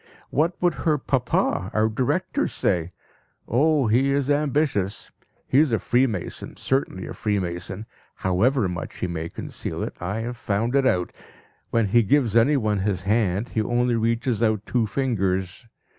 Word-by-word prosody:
What 165 +5 +1
would 175 -2 +2
her 155 -2 +2
papa, 125 - 0
our 110 0 +3
director, 115 +3 0
say? 85 -1 0 0.6
Oh, 145 +3 +3
he 125 +5 +3
is 140 0 +1
ambitious! 145 -9 0 0.3
He 130 - +3
is 155 -4 +3
a 115 - +3
freemason, 120 -2 -1
certainly 135 -8 -1
a - - -6
freemason; 95 -1 -3 0.3
however 105 +6 +2
much 90 -2 -5
he - - -2
may 85 -2 -4
conceal - - -5
it, - - -5
I 100 +5 -3
have 120 +1 -5
found 115 +2 -1
it 135 -1 +4
out. 90 -7 +1 0.6
When 115 -3 +1
he 120 +3 +5
gives 115 +1 +2
anyone 115 -4 +3
his 95 -1 -1
hand, 105 +1 +1
he 110 - 0
only 120 +2 +1
reaches 115 0 0
out 110 -2 +1
two 115 -2 0
fingers. 95 -4 -1
115 Hz, 155 wpm, -24 LUFS, 95-130 Hz, 0.6 s, he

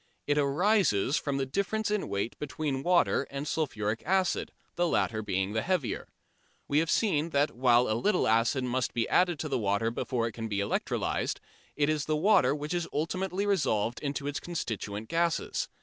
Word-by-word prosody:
It 145 0 +2
arises 150 - +2
from 140 -2 -2
the 135 - 0
difference 200 +8 -1
in 210 -2 -1
weight 100 +4 -2
between 145 -2 -3
water 175 -3 +2
and 140 +2 -5
sulphuric 110 -9 -1
acid, 190 -1 +1 0.2
the 175 0 +2
latter 110 -8 0
being 95 -1 -1
the 110 - 0
heavier. 180 -6 -1 0.6
We 145 - +3
have 165 0 0
seen 170 -8 +2
that 145 -1 +2
while 125 0 +3
a 110 - +1
little 180 - +1
acid 115 +4 +2
must 125 -1 -1
be 115 -1 +1
added 180 -2 +3
to 145 -3 -2
water 100 +2 0
before 120 0 -1
it 115 - -2
can 115 0 -5
be 100 -2 -2
electrolysed, 100 - -1 0.4
it 145 -1 +2
is 155 -2 0
the 155 - 0
water 190 -3 +4
which 150 +2 -4
is 175 -1 -1
ultimately 185 +5 -1
resolved 130 - +1
into 140 -1 -3
its 145 0 -2
constituent 110 - -4
gases. 170 +2 0
145 Hz, 180 wpm, -29 LUFS, 115-170 Hz, 0.6 s, water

